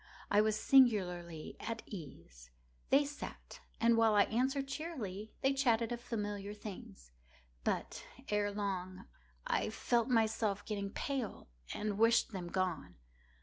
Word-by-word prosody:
I 205 - +6
was 215 0 +1
singularly 180 - +3
at 230 -1 -4
ease. 85 - -10 0.4
They 280 +2 +5
sat, 290 +1 -8 0.2
and 230 0 +5
while 225 -2 +4
I 205 - +7
answered 265 +5 0
cheerily, 240 - -5
they 270 +1 +3
chatted 240 -4 +2
of 240 0 -3
familiar 205 -3 -4
things. 180 - -9 0.5
But, - - -2 0.3
ere 210 0 +1
long, 190 -2 -3 0.4
I - - +1
felt 235 +2 +1
myself 220 -3 +1
getting 200 -2 -3
pale 255 - -4 0.2
and 210 -1 -2
wished 230 +1 +4
them 185 -4 -5
gone. 175 - -2
210 Hz, 130 wpm, -35 LUFS, 190-235 Hz, 0.5 s, I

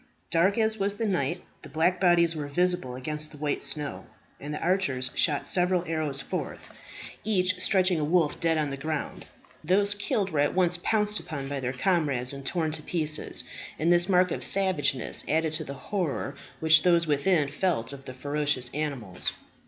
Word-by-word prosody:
Dark 185 +5 +3
as 220 -1 +1
was 200 +1 0
the 225 - -2
night, 175 -3 -1 0.2
the 150 - -11
black 160 +5 +1
bodies 170 -2 +4
were 150 -2 -4
visible 180 -4 0
against 150 +4 -3
the 150 - -12
white 145 0 -2
snow, 150 -5 -3 0.3
and 145 - -6
the 150 - -4
archers 140 -8 0
shot 145 -4 +1
several 180 -1 +1
arrows 155 -5 -2
forth, - - -5 0.5
each 185 -3 +1
stretching 185 -4 +3
a - - -1
wolf 160 -1 +1
dead 165 -1 +2
on 150 -2 -1
the 140 - -4
ground. 155 +1 -4 0.4
Those 200 +5 +3
killed 205 -1 -1
were 155 - -1
at 145 +3 +2
once 180 -1 +2
pounced 210 0 +1
upon 140 -4 -6
by 140 0 -3
their 125 -1 -2
comrades, 140 -4 0
and 140 0 -8
torn 160 +2 -1
to 155 0 -4
pieces; 155 -1 0 0.3
and 170 +3 +3
this 175 +2 +3
mark 180 -1 +4
of - - -2
savageness 155 - +2
added 160 0 +1
to 155 0 -1
the 140 -2 -7
horror 150 -3 -3 0.3
which 160 0 +6
those 170 -2 +3
within 150 +1 +2
felt 140 -5 -1
of 135 -1 -11
the 130 - -8
ferocious 145 -2 -1
animals. 135 -11 -2
160 Hz, 185 wpm, -27 LUFS, 145-180 Hz, 0.5 s, which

